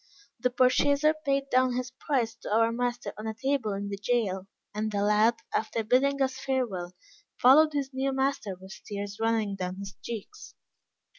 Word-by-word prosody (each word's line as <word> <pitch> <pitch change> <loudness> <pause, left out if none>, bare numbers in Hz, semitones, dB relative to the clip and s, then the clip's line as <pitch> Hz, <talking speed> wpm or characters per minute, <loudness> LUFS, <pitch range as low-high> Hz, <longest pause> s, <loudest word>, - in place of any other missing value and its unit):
The 250 +2 +2
purchaser 280 +4 +3
paid 275 -3 -1
down 255 0 +3
his 255 +1 -3
price 260 -3 -1
to - - -8
our 225 +1 +4
master 245 0 -2
on 215 - -5
a 220 - -3
table 265 -3 0
in 200 +1 -4
the 200 - -4
jail, 200 -3 -1 0.3
and 215 +1 -2
the 200 -1 0
lad, 210 +3 +4 0.2
after 225 +1 -1
bidding 270 +5 +3
us 260 0 -2
farewell, 215 -11 -2 0.4
followed 300 +5 +6
his 280 -2 -2
new 265 +1 0
master 265 -7 -1
with 190 +1 -11
tears 205 0 -5
running 225 -3 +1
down 180 -1 -3
his 195 0 -7
cheeks. 235 - -8
240 Hz, 170 wpm, -28 LUFS, 205-265 Hz, 0.4 s, followed